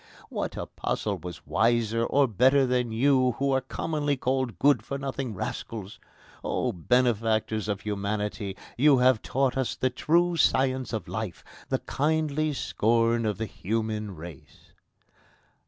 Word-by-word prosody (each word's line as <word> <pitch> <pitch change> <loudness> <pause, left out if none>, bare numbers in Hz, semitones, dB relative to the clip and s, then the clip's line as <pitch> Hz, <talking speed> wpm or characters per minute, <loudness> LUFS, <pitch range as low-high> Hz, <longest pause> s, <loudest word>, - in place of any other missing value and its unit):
What - - -4
apostle - - -3
was 90 -1 -8
wiser 115 +1 +2
or 140 +3 +3
better 130 +5 +4
than 125 -2 0
you, 130 +1 +3
who 140 +3 0
are 135 0 +2
commonly 145 +2 -2
called 130 -5 -1
good 145 +6 +4
for 140 - -4
nothing 135 -4 -4
rascals? 105 +2 -5 0.4
O 125 - 0
benefactors 110 +1 +1
of 100 -2 -2
humanity! 105 -1 -3 0.2
You 145 0 +6
have 125 -2 +4
taught 135 -1 0
us 130 -2 -1
the 130 - 0
true 170 +6 +2
science 130 -3 +2
of 110 -3 -4
life, 110 -5 -5 0.3
the - - +2
kindly 155 +1 0
scorn 115 -2 +1
of 105 -3 -1
the 110 - -2
human 110 0 -3
race!" 80 -3 -12
120 Hz, 140 wpm, -27 LUFS, 110-135 Hz, 0.4 s, You